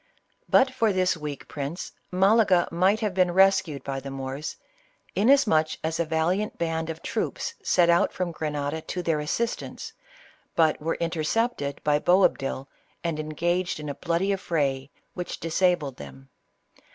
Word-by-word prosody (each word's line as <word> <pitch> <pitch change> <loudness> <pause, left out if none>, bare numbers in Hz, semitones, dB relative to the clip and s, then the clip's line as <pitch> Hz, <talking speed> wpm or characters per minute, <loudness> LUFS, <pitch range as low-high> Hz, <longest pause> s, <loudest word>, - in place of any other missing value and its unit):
But 260 0 +5
for 225 -4 +2
this 185 -1 +2
weak 150 -3 -6
prince, 145 +4 -5 0.2
Malaga 195 -1 +4
might 190 +6 +2
have 210 -3 -1
been 185 -1 +3
rescued 190 -6 +3
by 135 -1 -3
the 135 +1 -7
Moors, 135 +2 -5 0.6
inasmuch 205 - +4
as 160 +1 -2
a 170 - +2
valiant 165 +6 0
band 165 -1 -2
of 160 0 -6
troops 470 - -2
set 175 -2 +3
out 170 0 +4
from 180 -2 -3
Gre 160 -1 -4
nada 150 +1 -2
to 180 +2 -5
their 165 -3 +1
assistance, 225 +11 -3 0.6
but 160 -3 +3
were 165 +2 -1
intercepted 165 - -1
by 150 0 +3
Boab 180 +4 +4
dil 135 0 -4 0.4
and 165 -3 -2
engaged 170 +3 -1
in 150 -1 -5
a - - -2
bloody 170 +6 0
affray, 140 -8 -1 0.2
which 180 -1 -5
disabled 165 -4 +1
them. 65 -1 -11
165 Hz, 150 wpm, -26 LUFS, 150-185 Hz, 0.6 s, But